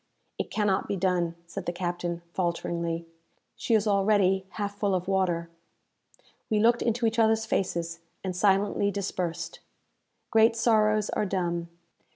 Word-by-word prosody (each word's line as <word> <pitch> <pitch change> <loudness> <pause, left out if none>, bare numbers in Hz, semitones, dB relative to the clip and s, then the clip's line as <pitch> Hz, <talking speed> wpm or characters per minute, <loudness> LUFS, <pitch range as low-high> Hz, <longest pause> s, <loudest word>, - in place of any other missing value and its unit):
"It - - -2
cannot 205 -3 +1
be - - -1
done," 175 -2 0
said 170 - -7
the - - +1
captain, 175 -1 -3
falteringly; 170 -1 -2 0.5
"she 230 - +1
is 215 -1 +2
already 195 -2 +3
half 205 -1 -3
full 200 -2 +1
of 180 0 -2
water." 175 -3 0 1.0
We 215 - +2
looked 235 +2 +4
into 235 0 0
each 225 +1 +1
others 220 0 +3
faces, 170 -5 -1 0.2
and 185 -2 -3
silently 200 +1 +2
dispersed. 190 -4 -3 0.7
Great 225 0 +5
sorrows 215 -2 +3
are 210 - 0
dumb. 175 -3 -2
195 Hz, 140 wpm, -27 LUFS, 175-215 Hz, 1.0 s, Great